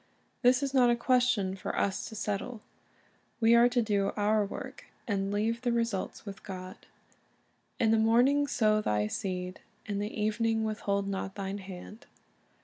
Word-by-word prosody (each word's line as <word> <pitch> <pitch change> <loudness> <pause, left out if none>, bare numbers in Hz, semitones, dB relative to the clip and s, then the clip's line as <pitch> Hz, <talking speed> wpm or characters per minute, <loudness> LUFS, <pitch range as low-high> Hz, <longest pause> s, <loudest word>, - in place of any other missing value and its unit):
This 250 +2 +4
is 275 -1 -2
not 250 -3 +5
a 240 - +4
question 235 -6 +2
for 190 - -5
us 195 -1 -1
to 220 - -9
settle. 210 +2 -3 0.8
We 230 0 +5
are 235 +1 +6
to 245 -1 +1
do 200 -2 0
our 210 +1 +3
work, 200 - -7 0.2
and 195 -2 -1
leave 225 +3 0
the 245 -1 0
results 230 -5 -2
with 195 -1 -8
God. 185 -1 -9 0.9
"In 220 -2 +3
the 225 - +4
morning 250 +6 +4
sow 215 -4 +2
thy 105 - +1
seed, 180 - -4 0.3
and 205 -2 -3
in - - -1
the 210 +2 -4
evening 220 +1 +1
withhold 200 -2 -1
not 195 -1 -4
thine 195 0 -4
hand." 195 +3 -10
215 Hz, 165 wpm, -30 LUFS, 195-235 Hz, 0.9 s, are